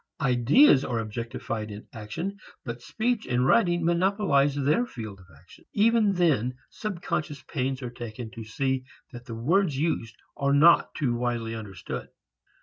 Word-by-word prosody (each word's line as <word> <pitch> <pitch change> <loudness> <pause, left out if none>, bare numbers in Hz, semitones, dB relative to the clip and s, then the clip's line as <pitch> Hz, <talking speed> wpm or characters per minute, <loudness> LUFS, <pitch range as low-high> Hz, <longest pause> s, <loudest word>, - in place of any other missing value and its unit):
Ideas 135 - +5
are 120 - -2
objectified 115 0 -4
in 105 +1 -9
action 165 - -5 0.3
but 120 -1 -5
speech 225 - -1
and 125 +1 +1
writing 175 +1 +3
monopolize 170 -5 +2
their 145 - +2
field 110 - -7
of 95 - -17
action. 90 - -19
Even 215 -1 +4
then 140 - +2 0.2
subconscious 170 -8 -4
pains 135 -2 -3
are 120 - -4
taken 120 -1 -7
to 115 - -8
see 130 +4 -1 0.3
that 120 -1 -10
the 115 - -6
words 155 - +1
used 140 -7 -1 0.2
are 140 0 +1
not 160 +4 +5
too 135 -6 0
widely 120 -1 -2
understood. 100 -5 -6
130 Hz, 145 wpm, -27 LUFS, 115-170 Hz, 0.3 s, Ideas